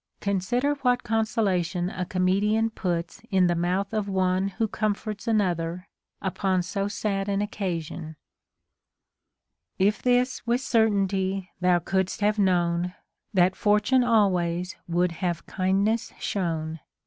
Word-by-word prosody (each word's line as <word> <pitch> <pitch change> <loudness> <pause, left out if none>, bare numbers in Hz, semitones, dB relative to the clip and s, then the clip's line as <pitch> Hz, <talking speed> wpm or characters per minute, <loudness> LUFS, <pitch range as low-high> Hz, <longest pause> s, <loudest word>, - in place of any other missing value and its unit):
Consider 205 +9 0
what 250 -1 +2
consolation 195 -5 0
a 180 - -3
comedian 200 +5 +1
puts 170 -5 -3
in 190 -3 +4
the 175 - +3
mouth 180 +4 -1
of 210 -2 -1
one 185 0 +1
who 220 +3 -1
comforts 210 0 -3
another 180 -4 0 0.4
upon 190 -1 0
so 195 +2 -2
sad 205 -1 -2
an 200 0 0
occasion: 170 -6 -4 0.8
— - - -59 0.7
If 200 +3 +2
this 250 +1 +2
\vitli 240 +1 +2
certainty 195 -6 +1
thou 180 -1 +4
coukl'st 190 +4 -1
have 210 +1 +2
known, 180 -2 +1 0.4
Tliat 185 0 +4
Fortune 210 +6 +3
always 180 -6 +1
wnuhl 175 +1 +2
have 170 0 -3
kindness 195 +4 0
sliown. 160 -4 -2
195 Hz, 125 wpm, -26 LUFS, 180-210 Hz, 0.8 s, in